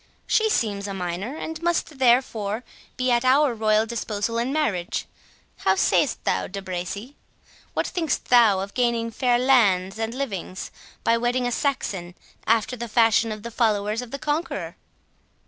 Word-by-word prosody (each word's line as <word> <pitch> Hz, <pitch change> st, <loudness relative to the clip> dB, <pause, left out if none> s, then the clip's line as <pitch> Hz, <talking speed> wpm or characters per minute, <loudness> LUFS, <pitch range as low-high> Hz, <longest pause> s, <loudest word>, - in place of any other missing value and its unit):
She 440 Hz, 0 st, +2 dB
seems 205 Hz, -, 0 dB
a 200 Hz, -, -4 dB
minor, 185 Hz, -, -4 dB
and 320 Hz, 0 st, -6 dB
must 335 Hz, -4 st, -1 dB
therefore 235 Hz, -3 st, +2 dB, 0.3 s
be 255 Hz, 0 st, +1 dB
at 240 Hz, 0 st, +3 dB
our 265 Hz, +1 st, +4 dB
royal 215 Hz, -1 st, +2 dB
disposal 225 Hz, 0 st, -2 dB
in 240 Hz, +3 st, -1 dB
marriage.—How 220 Hz, -, -2 dB
sayst -, -, +2 dB
thou, 95 Hz, -, 0 dB
De 195 Hz, -, -6 dB
Bracy? 190 Hz, +7 st, -5 dB, 0.6 s
What -, -, +1 dB
thinkst 325 Hz, -6 st, -1 dB
thou 225 Hz, -6 st, +5 dB
of 200 Hz, +1 st, -6 dB
gaining 235 Hz, -2 st, 0 dB
fair 245 Hz, +2 st, +2 dB
lands 220 Hz, -7 st, +3 dB
and 225 Hz, +1 st, -2 dB
livings, 195 Hz, -8 st, -4 dB, 0.3 s
by 230 Hz, 0 st, +3 dB
wedding 245 Hz, +1 st, 0 dB
a 245 Hz, -, 0 dB
Saxon, 195 Hz, -, -2 dB, 0.3 s
after 225 Hz, +2 st, +2 dB
the 235 Hz, 0 st, -5 dB
fashion 225 Hz, 0 st, +3 dB
of 215 Hz, -1 st, -6 dB
the 235 Hz, -, -6 dB
followers 215 Hz, -1 st, +1 dB
of 245 Hz, -, -8 dB
the 275 Hz, -, -5 dB
Conqueror?" 300 Hz, +4 st, -3 dB
230 Hz, 155 wpm, -24 LUFS, 205-255 Hz, 0.6 s, thou